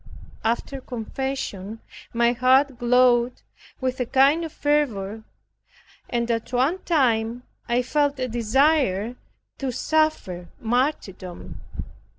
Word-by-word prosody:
After 240 Hz, +4 st, -1 dB
confession 225 Hz, -4 st, -4 dB, 0.3 s
my 235 Hz, 0 st, +3 dB
heart 255 Hz, +1 st, +3 dB
glowed 245 Hz, 0 st, +3 dB, 0.4 s
with 260 Hz, -1 st, -2 dB
a 250 Hz, -, -1 dB
kind 275 Hz, +6 st, +4 dB
of 325 Hz, -, -5 dB
fervor, 225 Hz, -10 st, 0 dB, 0.9 s
and 235 Hz, 0 st, 0 dB
at 230 Hz, 0 st, -2 dB
one 265 Hz, +9 st, +1 dB
time 245 Hz, -8 st, +1 dB, 0.3 s
I 245 Hz, +1 st, +2 dB
felt 285 Hz, +2 st, +1 dB
a 255 Hz, -1 st, -1 dB
desire 240 Hz, -2 st, +2 dB, 0.4 s
to 270 Hz, -2 st, -2 dB
suffer 280 Hz, -, 0 dB
martyrdom. 225 Hz, -, -2 dB
250 Hz, 105 wpm, -24 LUFS, 230-275 Hz, 0.9 s, kind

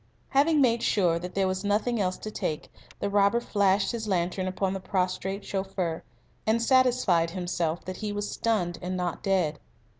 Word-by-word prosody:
Having 295 Hz, +2 st, +4 dB
made 235 Hz, -3 st, +3 dB
sure 175 Hz, -5 st, +2 dB
that 180 Hz, +1 st, -7 dB
there 195 Hz, -1 st, +2 dB
was 185 Hz, +1 st, -2 dB
nothing 215 Hz, +3 st, +1 dB
else 185 Hz, -1 st, 0 dB
to 215 Hz, -, -7 dB
take, 155 Hz, -5 st, -3 dB, 0.3 s
the -, -, -1 dB
robber 200 Hz, +3 st, +3 dB
flashed 200 Hz, -3 st, +2 dB
his 225 Hz, -2 st, -4 dB
lantern 185 Hz, 0 st, 0 dB
upon 190 Hz, 0 st, -1 dB
the 195 Hz, -, -3 dB
prostrate 190 Hz, +1 st, -2 dB
chauffeur, 190 Hz, -4 st, -2 dB, 0.5 s
and 220 Hz, +1 st, +3 dB
satisfied 240 Hz, -9 st, +3 dB
himself 175 Hz, -2 st, -2 dB
that 185 Hz, 0 st, -5 dB
he 215 Hz, -1 st, -3 dB
was 205 Hz, 0 st, -3 dB
stunned 185 Hz, -7 st, -1 dB
and 185 Hz, +1 st, -3 dB
not 180 Hz, -2 st, -2 dB
dead. 180 Hz, -6 st, +1 dB
195 Hz, 175 wpm, -27 LUFS, 180-215 Hz, 0.5 s, Having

